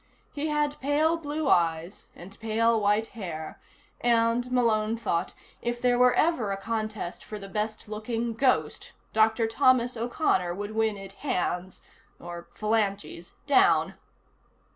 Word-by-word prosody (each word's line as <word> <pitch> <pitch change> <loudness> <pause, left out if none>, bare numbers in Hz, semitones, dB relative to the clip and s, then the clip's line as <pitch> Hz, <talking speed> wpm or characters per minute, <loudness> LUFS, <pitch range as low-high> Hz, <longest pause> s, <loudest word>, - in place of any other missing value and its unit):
He 295 +2 -2
had 295 -1 0
pale 300 +4 +2
blue 305 -2 -3
eyes 170 -1 +1
and 190 +3 -12
pale 225 0 +2
white 210 +2 +2
hair, 170 -8 -7 0.4
and, 235 +1 +2
Malone 225 -3 +2
thought, 185 -6 -2 0.3
if 240 0 -2
there 245 0 +2 0.2
ever 325 -6 +2
were 200 - -2
a 195 - -2
contest 215 -3 -4
for 215 - -7
the 195 -1 -8
best 215 +2 -3
looking 225 +2 -3
ghost, 255 +3 0 0.2
Dr. 220 +1 +3
Thomas 250 +1 +3
O'Connor 225 - 0
would 205 +2 -5
win 220 -1 0
it 195 0 -10
hands 185 -8 -3 0.4
(or 170 0 -8
phalanges) 200 -6 -1
down. 380 +8 +4
220 Hz, 135 wpm, -27 LUFS, 200-245 Hz, 0.4 s, down